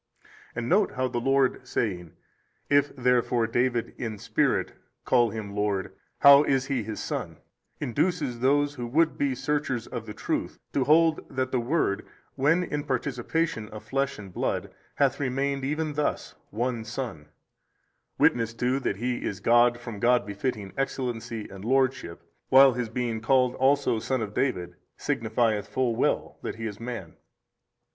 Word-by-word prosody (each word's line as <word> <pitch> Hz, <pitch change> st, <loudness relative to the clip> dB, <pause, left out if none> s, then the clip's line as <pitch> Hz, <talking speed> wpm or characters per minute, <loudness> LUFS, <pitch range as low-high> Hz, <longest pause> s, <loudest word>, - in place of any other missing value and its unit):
And 115 Hz, 0 st, -3 dB
note 200 Hz, +7 st, +3 dB
how 130 Hz, 0 st, 0 dB
the 120 Hz, -1 st, -2 dB
Lord 135 Hz, 0 st, +1 dB
saying, 90 Hz, -10 st, -2 dB, 0.6 s
If 145 Hz, 0 st, +4 dB
therefore 125 Hz, -2 st, +2 dB
David 120 Hz, +1 st, 0 dB
in 110 Hz, -3 st, -4 dB
spirit -, -, 0 dB, 0.3 s
call 120 Hz, -1 st, +4 dB
Him 105 Hz, -2 st, -6 dB
Lord 105 Hz, -2 st, -1 dB, 0.3 s
how 140 Hz, 0 st, +9 dB
is 135 Hz, -3 st, +1 dB
He 135 Hz, -3 st, -1 dB
his 110 Hz, 0 st, -5 dB
Son, -, -, -4 dB, 0.4 s
induces 145 Hz, -1 st, -1 dB
those 145 Hz, +3 st, +2 dB
who 120 Hz, -4 st, -5 dB
would 160 Hz, +6 st, +2 dB
be 140 Hz, -2 st, 0 dB
searchers 135 Hz, -5 st, -1 dB
of 115 Hz, -1 st, -6 dB
the 105 Hz, -, -6 dB
truth, -, -, -3 dB, 0.2 s
to 135 Hz, -, +1 dB
hold 160 Hz, +2 st, +4 dB
that 130 Hz, -1 st, -2 dB
the 130 Hz, -, +1 dB
Word 120 Hz, -5 st, 0 dB, 0.3 s
when 165 Hz, +7 st, +2 dB
in 150 Hz, -4 st, -3 dB
participation 130 Hz, -2 st, -2 dB
of 105 Hz, 0 st, -9 dB
flesh 135 Hz, +5 st, -1 dB
and 95 Hz, -3 st, -10 dB
blood -, -, -2 dB, 0.2 s
hath 135 Hz, -2 st, +2 dB
remained 135 Hz, 0 st, -1 dB
even 150 Hz, +2 st, -1 dB
thus 150 Hz, 0 st, -2 dB, 0.2 s
One 120 Hz, +1 st, -2 dB
Son: 115 Hz, -, -6 dB, 0.9 s
witnessed 115 Hz, -1 st, +2 dB
to 125 Hz, +3 st, +1 dB
that 115 Hz, -, -1 dB
He 125 Hz, +2 st, -2 dB
is 95 Hz, -, -3 dB
God 120 Hz, +3 st, +4 dB
from 115 Hz, -4 st, -7 dB
God 120 Hz, -1 st, +3 dB
befitting 100 Hz, -1 st, -4 dB
Excellency 120 Hz, -5 st, -3 dB
and 95 Hz, 0 st, -10 dB
Lordship, 130 Hz, -7 st, 0 dB, 0.3 s
while 135 Hz, 0 st, +8 dB
His 120 Hz, -1 st, -3 dB
being 115 Hz, -1 st, -2 dB
called 125 Hz, +1 st, +3 dB
also 135 Hz, -3 st, +2 dB
Son 125 Hz, +1 st, -1 dB
of 105 Hz, -1 st, -6 dB
David 90 Hz, -11 st, -1 dB, 0.2 s
signifieth 110 Hz, -4 st, 0 dB
full 120 Hz, +2 st, 0 dB
well -, -, 0 dB
that -, -, -4 dB
He 115 Hz, 0 st, -6 dB
is 105 Hz, -2 st, -5 dB
Man. 115 Hz, -8 st, -6 dB
125 Hz, 155 wpm, -27 LUFS, 110-135 Hz, 0.9 s, how